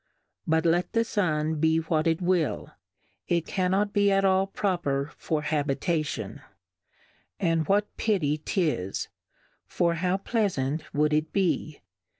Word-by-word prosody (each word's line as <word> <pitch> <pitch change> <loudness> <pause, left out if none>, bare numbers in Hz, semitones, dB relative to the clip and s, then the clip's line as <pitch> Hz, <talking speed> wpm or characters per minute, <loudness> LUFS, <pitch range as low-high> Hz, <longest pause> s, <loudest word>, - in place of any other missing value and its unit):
But 160 +1 +2
let 175 +1 +1
the 230 - +3
Sun 160 -8 0
be 160 +1 +3
what 160 0 0
it 165 +2 +1
will, 175 -4 0 0.6
it 170 -2 +1
cannot 195 +2 0
be 200 -1 +3
at 195 0 +3
all 190 0 +3
proper 170 -8 -1
for 155 -2 -2
Habitation; 150 +1 -1 1.0
and 165 -4 +1
what 205 +1 +1
pity 155 -9 +1
'tis, 150 - -1 0.6
for 170 -1 +1
how 180 +3 0
Pleafant 165 - -1
wou'd 150 +1 +1
it 155 +1 0
be 175 -5 -1
165 Hz, 130 wpm, -27 LUFS, 155-190 Hz, 1.0 s, the